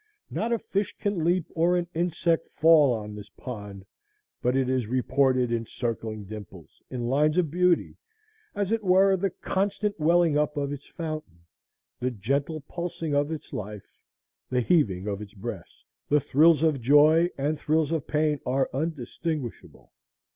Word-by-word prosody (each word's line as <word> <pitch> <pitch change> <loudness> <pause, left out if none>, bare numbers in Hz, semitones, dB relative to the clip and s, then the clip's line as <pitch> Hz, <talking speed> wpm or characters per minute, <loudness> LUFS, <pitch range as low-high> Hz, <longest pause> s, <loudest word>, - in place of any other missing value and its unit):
Not 230 +2 -2
a 235 - +3
fish 200 -1 -2
can 200 -5 -1
leap 175 0 +2
or 170 +2 +2
an 175 - 0
insect 170 0 0
fall 155 -4 +6
on 105 -3 -4
the 105 0 -7
pond 105 -6 -8 0.6
but 125 +1 +1
it 135 -1 +2
is 130 -2 0
thus - - -11
reported 130 -1 +2
in 115 -1 -1
circling 110 -3 -4
dimples, 105 -1 -11
in 125 -2 -4
lines 150 +5 +2
of 170 -5 +2
beauty, 180 0 +2 0.6
as 205 0 -1
it 225 -1 0
were 190 +1 +5
the 195 +1 0
constant 200 +2 -2
welling 165 -1 +3
up 150 0 -1
of 140 0 -1
its 145 -1 -9
fountain, 155 - -6 0.6
the 125 - 0
gentle 140 +8 -2
pulsing 165 0 -4
of 145 +2 +1
its 160 - -7
life, 105 -1 -7 0.5
the 125 -1 +1
heaving 110 - +2
of 100 0 -3
its 105 0 -10
breast. 100 - -8 0.3
The 150 - +4
thrills 155 +3 +4
of 155 -5 +2
joy 150 +6 +5
and 145 +2 -1
thrills 155 0 +1
of 160 -4 -2
pain 150 -1 +1
are 135 +1 0
undistinguishable. 150 -1 -4
150 Hz, 160 wpm, -26 LUFS, 125-170 Hz, 0.6 s, fall